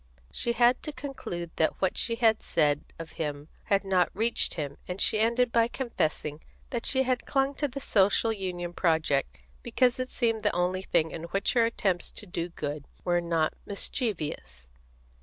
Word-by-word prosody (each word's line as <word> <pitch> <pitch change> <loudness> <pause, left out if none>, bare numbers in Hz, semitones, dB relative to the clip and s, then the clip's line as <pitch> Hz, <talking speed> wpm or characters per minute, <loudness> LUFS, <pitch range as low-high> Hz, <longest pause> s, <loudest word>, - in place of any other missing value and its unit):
She 235 - -1
had 240 +1 +4
to 305 - -4
conclude 180 - -6
that 160 - +1
what 190 - +1
she 230 - +1
had 225 -2 +3
said 150 -2 +1
of 165 -1 -8
him 145 0 -4 0.2
had 200 -2 +2
not 185 -2 +3
reached 225 +3 +2
him, 145 -4 -4
and 180 +1 -4
she 215 - +3
ended 235 +2 +2
by 230 -1 +4
confessing 155 - -2 0.3
that 235 -3 -1
she 265 -1 +4
had 255 -1 -1
clung 270 0 +1
to 290 - 0
the 275 +1 -6
Social 205 +1 +3
Union 180 -4 -4
project 155 - +1 0.2
because 250 - +2
it 255 0 -2
seemed 225 -2 0
the 210 -3 +1
only 180 +1 0
thing 160 -4 +1
in 165 - -6
which 195 +4 0
her 230 -2 +4
attempts 190 -6 0
to - - -7
do 175 -2 -4
good 145 -3 -5 0.2
were 175 -1 +2
not 165 -2 +1
mischievous. 155 - -3
190 Hz, 175 wpm, -28 LUFS, 165-235 Hz, 0.3 s, had